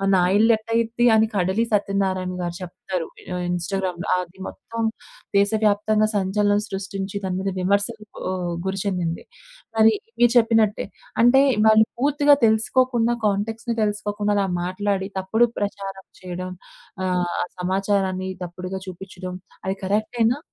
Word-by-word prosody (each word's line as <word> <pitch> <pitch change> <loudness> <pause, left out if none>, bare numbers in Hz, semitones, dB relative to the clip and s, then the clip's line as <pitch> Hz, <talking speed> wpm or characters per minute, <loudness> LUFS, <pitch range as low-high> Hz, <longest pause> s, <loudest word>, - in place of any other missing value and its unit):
నా 185 - +4 0.2
ఇల్లు 225 +2 +5
ఎట్టా 220 +1 -9
అయిద్ది 230 +1 +1
అని 220 0 +4
కడలి 190 +4 +1
సత్యనారాయణ 195 -2 0
గారు 175 -1 -3
చెప్తారు 180 -1 -5 0.3
ఆహ్, 180 - -2
ఇన్‌స్టా‌గ్రామ్‌లో, 180 0 -2 0.2
అది 180 +2 -16
మొత్తం 230 0 -7 0.6
దేశవ్యాప్తంగా 215 +1 +3
సంచలనం 205 +1 +2
సృష్టించి 195 0 -5
దాని 185 -1 -2
మీద 195 0 -1
విమర్శలు 205 +3 0 0.3
ఆహ్, 180 -2 -2
గురి 190 0 -2
చెందింది. 180 -4 -2 0.5
మరి 220 0 +6 0.3
మీరు 240 -1 +5
చెప్పినట్టే 225 -2 +3 0.4
అంటే 265 +3 +6 0.3
వాళ్ళు 220 0 +6
పూర్తిగా 290 +1 +4
తెలుసుకోకుండా 235 +2 +2
కాంటా‌క్ట్స్‌ని 220 +3 -1
తెలుసుకోకుండా 210 0 -1
అలా 200 - +2 0.2
మాట్లాడి 190 +1 -1
తప్పుడు 220 +6 +2
ప్రచారం 195 -1 -4 0.2
చేయడం 185 0 -5 0.5
ఆహ్, 180 -1 0 0.2
సమాచారాన్ని 190 0 0
తప్పుడుగా 180 +2 -6
చూపించడం 185 0 -7 0.3
అది 190 +1 -1
కరెక్టే‌నా? 225 +5 +1
200 Hz, 125 wpm, -23 LUFS, 185-220 Hz, 0.6 s, మరి